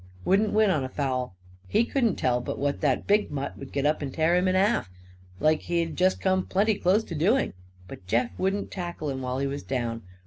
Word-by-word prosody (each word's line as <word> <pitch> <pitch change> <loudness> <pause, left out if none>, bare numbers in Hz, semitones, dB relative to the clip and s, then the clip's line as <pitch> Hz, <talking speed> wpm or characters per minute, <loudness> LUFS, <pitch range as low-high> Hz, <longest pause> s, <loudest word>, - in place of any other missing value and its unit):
Wouldn't 205 +2 +3
win 215 -2 +4
on 150 -6 +1
a 130 - -4
foul. 130 -7 -2 0.3
He 225 - +2
couldn't 235 -6 +1
tell 125 -1 +1
but - - -4
what 140 0 -1
that 135 -4 +1
big 205 +1 +2
mutt 140 -1 -4
would 135 - -9
get 140 0 -1
up 150 +1 +1
and 140 -2 -3
tear 160 +4 +2
him 180 +1 +2
in 185 - +2
half, 195 - +2 0.5
like 155 +4 +3
he'd 170 -2 -2
just 185 +1 +2
come 185 -1 +1
plenty 210 +3 +2
close 200 +2 +2
to 175 - -8
doing. 200 - +2 0.3
But 90 0 -11
Jeff 115 +4 +1
wouldn't 195 +2 -1
tackle 175 -5 -4
him 130 -1 -4
while 130 0 -2
he 140 - -1
was 140 +1 -3
down. 120 -3 -3
155 Hz, 220 wpm, -26 LUFS, 135-190 Hz, 0.5 s, win